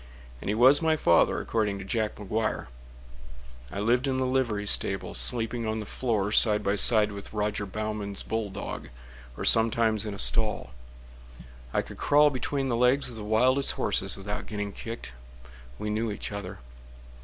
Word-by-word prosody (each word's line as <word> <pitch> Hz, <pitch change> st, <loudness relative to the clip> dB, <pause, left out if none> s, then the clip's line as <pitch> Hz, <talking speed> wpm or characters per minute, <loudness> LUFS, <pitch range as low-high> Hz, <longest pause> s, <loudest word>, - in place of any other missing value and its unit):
And -, -, -5 dB
he 105 Hz, -, 0 dB
was 130 Hz, +6 st, +5 dB
my 160 Hz, -1 st, +2 dB
father, 85 Hz, -, +2 dB
according 105 Hz, -3 st, -2 dB
to 100 Hz, -, -9 dB
Jack 110 Hz, +1 st, -2 dB
McGuire. 110 Hz, +2 st, -3 dB, 1.1 s
I 100 Hz, -, -6 dB
lived 120 Hz, +6 st, +1 dB
in 130 Hz, -1 st, -1 dB
the 130 Hz, -, -1 dB
livery 125 Hz, -6 st, -1 dB
stable, 95 Hz, -1 st, +2 dB
Sleeping 115 Hz, -1 st, 0 dB
on 110 Hz, 0 st, -2 dB
the 105 Hz, -, -6 dB
floor 105 Hz, -4 st, -2 dB
Side 105 Hz, -1 st, +5 dB
by 100 Hz, +1 st, 0 dB
side 105 Hz, 0 st, +5 dB
with 100 Hz, -1 st, -9 dB
Roger 105 Hz, -1 st, -3 dB
Baughman's 105 Hz, 0 st, -5 dB
bulldog, 110 Hz, -3 st, -5 dB, 0.5 s
Or -, -, -5 dB
sometimes 110 Hz, -1 st, +4 dB
in 105 Hz, -2 st, -5 dB
a -, -, -9 dB
stall. 105 Hz, -, +3 dB, 1.0 s
I -, -, -1 dB
could -, -, -11 dB
crawl 150 Hz, +1 st, +4 dB
between 135 Hz, +1 st, -3 dB
the 120 Hz, -, -1 dB
legs 125 Hz, +2 st, +2 dB
of -, -, -9 dB
the 110 Hz, -, -7 dB
wildest 125 Hz, +6 st, +1 dB
horses -, -, -1 dB
Without 100 Hz, +2 st, -6 dB
getting 105 Hz, -1 st, -5 dB
kicked—we -, -, -10 dB
knew 110 Hz, +1 st, -2 dB
each 105 Hz, -, -6 dB
other. 100 Hz, 0 st, -7 dB
110 Hz, 165 wpm, -26 LUFS, 100-120 Hz, 1.1 s, was